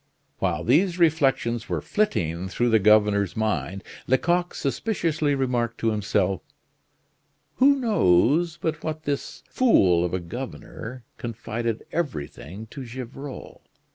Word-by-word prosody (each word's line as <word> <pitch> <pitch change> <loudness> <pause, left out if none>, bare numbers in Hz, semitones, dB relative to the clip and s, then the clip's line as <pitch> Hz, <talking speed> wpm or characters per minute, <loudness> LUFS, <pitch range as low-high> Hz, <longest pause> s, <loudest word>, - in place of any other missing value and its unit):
While - - 0
these 170 - +3
reflections 135 -8 +2
were - - 0
flitting 95 - -1
through 120 +6 0
the 110 - +5
governor's 105 -2 +3
mind, 105 -3 -1 0.2
Lecoq 175 +7 +1
suspiciously 155 -2 0
remarked 120 -3 -1
to 115 - +2
himself: 100 -3 0 1.2
"Who 280 +2 +6
knows 165 - +3
but 155 -1 -3
what 155 0 -4
this 145 -2 -4
fool 95 - +4
of 90 0 -1
a - - -1
governor 120 +4 -7 0.2
confided 115 -1 -4
everything 100 - -4
to 135 - -7
Gevrol? 130 +3 -8
120 Hz, 115 wpm, -25 LUFS, 105-155 Hz, 1.2 s, Who